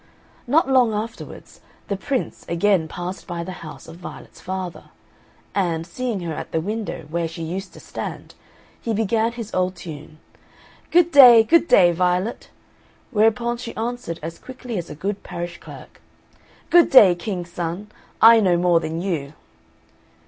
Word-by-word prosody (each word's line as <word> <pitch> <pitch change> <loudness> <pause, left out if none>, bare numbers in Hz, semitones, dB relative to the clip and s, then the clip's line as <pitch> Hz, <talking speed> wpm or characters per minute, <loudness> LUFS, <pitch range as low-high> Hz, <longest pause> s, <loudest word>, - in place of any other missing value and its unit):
Not 290 +4 +3
long 250 -5 +3
afterwards, 225 +3 -7 0.3
the 200 - -1
Prince 260 +6 -3
again 170 -1 +2
passed 180 +4 -7
by 170 -2 -4
the 185 - -7
house 155 -2 -10
of 165 +1 -11
Violet's 180 - -11
father; 185 -1 -5 0.7
and, 170 -5 -1
seeing 225 +3 -4
her 170 -2 -4
at - - -7
the 160 - 0
window 205 -2 -4
where 170 0 -1
she 165 +1 -7
used 185 +4 -5
to - - -13
stand, - - -7 0.5
he 225 -2 -2
began 225 +2 0
his 230 -3 -8
old 185 0 0
tune, 155 -2 -10 0.7
"Good 345 0 +4
day, 250 -6 +9
good 335 +8 +3
day, 175 -2 +6
Violet!" 180 +5 -1 0.6
Whereupon 235 +2 +2
she 235 -1 -8
answered 225 -7 -4
as 165 +1 -6
quickly 250 -5 -6
as 170 - -7
a - - -7
good 200 +5 -4
parish 175 0 -6
clerk, - - -13 0.7
"Good 345 -1 +6
day, 205 -9 +8
King's 175 0 -5
son! 175 +5 -5 0.3
I 230 +1 +8
know 185 -5 +3
more 175 -1 +3
than 165 +1 -4
you." 155 -7 -3
190 Hz, 155 wpm, -22 LUFS, 170-230 Hz, 0.7 s, day